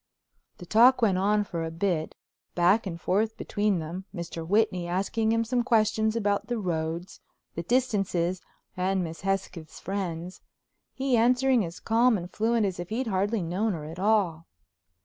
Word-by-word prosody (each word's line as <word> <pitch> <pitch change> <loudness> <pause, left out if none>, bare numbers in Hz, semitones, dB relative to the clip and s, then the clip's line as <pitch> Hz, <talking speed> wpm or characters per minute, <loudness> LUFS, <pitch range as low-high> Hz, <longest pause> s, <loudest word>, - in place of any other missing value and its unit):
The 175 - -10
talk 240 +6 +5
went 190 -4 +3
on 210 +2 +2
for 170 -4 -4
a 165 - -3
bit, 165 -1 -2 0.4
back 185 +5 +3
and 170 -2 -5
forth 220 +6 0
between 205 -2 0
them, 170 +4 -5
Mr. 170 -1 -5
Whitney 190 -3 +1
asking 200 +5 0
him 230 0 +2
some 240 +2 0
questions 220 -2 +2
about 205 -3 0
the 240 -1 -2
roads, 170 -2 -3 0.3
the 170 - -4
distances, 195 -6 0 0.3
and 185 +1 0
Miss 165 -1 -7
Hesketh's 190 -5 -3
friends; 180 -2 -4 0.5
he 265 -1 0
answering 250 +1 +3
as 170 -1 -7
calm 230 +1 +3
and 175 -1 -7
fluent 225 0 +1
as 185 -3 -3
if 175 - -5
he'd 240 +5 -2
hardly 205 0 0
known 190 +6 -1
her 155 -3 -6
at 165 +3 -8
all. 190 -6 +1
195 Hz, 165 wpm, -27 LUFS, 175-225 Hz, 0.5 s, talk